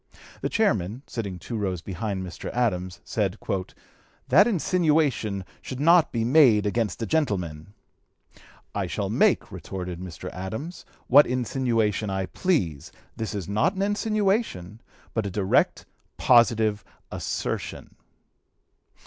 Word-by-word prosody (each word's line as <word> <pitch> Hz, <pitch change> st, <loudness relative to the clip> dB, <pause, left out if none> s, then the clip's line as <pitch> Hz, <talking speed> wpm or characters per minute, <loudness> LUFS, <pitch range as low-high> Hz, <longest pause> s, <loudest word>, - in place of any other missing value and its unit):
The -, -, -1 dB
chairman, 115 Hz, -, 0 dB
sitting 100 Hz, -6 st, -5 dB
two 115 Hz, +7 st, -7 dB
rows 95 Hz, -5 st, -2 dB
behind 95 Hz, 0 st, -3 dB
Mr. 90 Hz, -, -7 dB
Adams, 95 Hz, -7 st, -1 dB
said, 105 Hz, -2 st, -1 dB, 0.9 s
"that 185 Hz, -, +6 dB
insinuation 155 Hz, -, +1 dB, 0.2 s
should 130 Hz, -, -7 dB
not 165 Hz, +2 st, +5 dB
be 115 Hz, -, -1 dB
(p. -, -, +1 dB
260) 120 Hz, +4 st, -1 dB, 0.2 s
made 105 Hz, -, -1 dB
against 110 Hz, 0 st, -1 dB
a -, -, 0 dB
gentleman!" 100 Hz, -, -2 dB, 1.0 s
"I -, -, -2 dB
shall -, -, -3 dB
make," -, -, +2 dB
retorted 90 Hz, -2 st, -6 dB
Mr. 90 Hz, 0 st, -7 dB
Adams, 110 Hz, -, -6 dB, 0.2 s
"what 145 Hz, +4 st, +7 dB
insinuation 120 Hz, -4 st, 0 dB
I 95 Hz, -1 st, -1 dB
please. 95 Hz, -, -1 dB, 0.2 s
This 110 Hz, -1 st, -4 dB
is 95 Hz, -5 st, -4 dB
not 105 Hz, -, +1 dB
an 190 Hz, -, -1 dB
insinuation, 205 Hz, -, 0 dB, 0.3 s
but 110 Hz, -3 st, -1 dB
a -, -, -3 dB
direct, 95 Hz, 0 st, +1 dB, 0.3 s
positive 110 Hz, -4 st, +4 dB, 0.3 s
assertion." -, -, -4 dB
110 Hz, 125 wpm, -25 LUFS, 95-140 Hz, 1.0 s, what